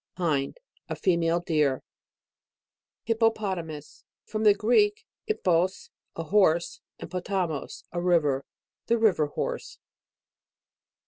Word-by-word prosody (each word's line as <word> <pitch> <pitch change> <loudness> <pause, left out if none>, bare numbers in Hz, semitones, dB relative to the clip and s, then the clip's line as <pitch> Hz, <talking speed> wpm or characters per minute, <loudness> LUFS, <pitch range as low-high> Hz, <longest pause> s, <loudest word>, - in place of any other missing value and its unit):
HIND. 155 - -1 0.3
A - - -2
female 170 -2 +1
deer. 150 -6 +1 1.2
HIPPOPOTAMUS. 200 -9 -1 0.2
From 215 0 -3
the 205 -1 +7
Greek, 415 - +2 0.2
ip 435 - -2
pox, 180 +1 +1 0.2
a 165 - -3
horse, 170 -1 +2 0.2
and - - -8
potamos, 180 -4 -3
a 175 - -2
river. 155 -7 +2 0.4
The 235 - +3
river 200 -9 +3
hor=e. 145 - -3
175 Hz, 105 wpm, -27 LUFS, 160-210 Hz, 1.2 s, the